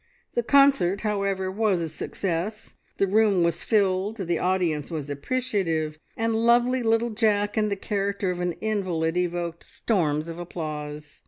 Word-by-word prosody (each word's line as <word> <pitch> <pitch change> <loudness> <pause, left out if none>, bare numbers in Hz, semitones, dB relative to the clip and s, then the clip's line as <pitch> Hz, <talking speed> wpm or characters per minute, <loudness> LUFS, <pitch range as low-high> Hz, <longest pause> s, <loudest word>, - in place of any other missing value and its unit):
The 240 - +1
concert, 240 -8 +4
however, 200 -3 -1
was 205 -2 +1
a 165 - -2
success: 180 +5 -4 0.2
the 195 - +3
room 200 -2 +3
was 170 0 0
filled, 200 0 +1
the 175 -5 -1
audience 175 -5 0
was 150 -4 -4
appreciative, 165 - -1 0.2
and 225 0 0
lovely 240 +2 +4
little 225 0 +2
Jack 210 -2 +1
in 215 -1 +1
the 200 - 0
character 200 -1 -1
of 180 - -4
an 180 -1 -1
invalid 180 -6 -1
evoked 175 -1 -2
storms 155 -8 -1
of 165 0 -6
applause. 150 -3 -6
190 Hz, 150 wpm, -25 LUFS, 170-215 Hz, 0.2 s, concert